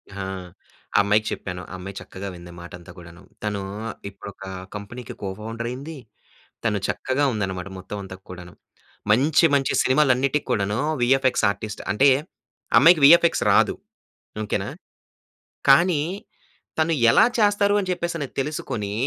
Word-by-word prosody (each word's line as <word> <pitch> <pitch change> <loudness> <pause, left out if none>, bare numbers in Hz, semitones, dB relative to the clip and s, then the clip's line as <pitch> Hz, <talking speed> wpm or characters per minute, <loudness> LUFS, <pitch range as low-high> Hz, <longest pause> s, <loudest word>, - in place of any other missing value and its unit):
హా! 100 -1 -4 0.7
ఆ - - +6
అమ్మాయికి 105 +2 +2
చెప్పాను. 90 -1 -5
ఆ - - -7
అమ్మాయి 95 +1 -8
చక్కగా 95 +1 -8
వింది 85 0 -11
మాట 85 0 -10
అంతా 85 - -13
కూడాను. 85 0 -13 0.2
తను 105 -1 -2 0.5
ఇప్పుడొక 100 -1 -11 0.3
కంపెనీకి 105 +3 -8
కో 100 - -3
ఫౌండర్ 115 +2 -5
అయింది, 140 +6 -7 0.7
తను 105 -3 0
చక్కగా 130 +2 -1
ఉందన్నమాట 95 -3 -3
మొత్తం 95 +2 -7
అంతా 95 -1 -9
కూడాను. 90 -1 -10 0.6
మంచి 140 +9 +4
మంచి 135 -1 +1
సినిమాలన్నిటికి 135 +1 +2
కూడాను. 105 -2 0 0.2
'వీఎఫ్ఎక్స్ 130 +1 +3
ఆర్టిస్ట్' 100 +1 -5
అంటే 135 +8 +5 0.7
అమ్మాయికి 165 +2 +7
వీఎఫ్ఎక్స్ 170 +3 +6
రాదు. - - +4 0.7
ఓకే‌నా? 105 - -2 1.0
కానీ 155 +3 +5 0.8
తను 160 +1 +2 0.2
ఎలా - - +6
చేస్తారు 205 -1 +3
అని 190 -2 -3
చెప్పేస‌నేది 170 -5 -4
తెలుసుకొని, 130 -7 -3
115 Hz, 130 wpm, -23 LUFS, 100-145 Hz, 1.0 s, అమ్మాయికి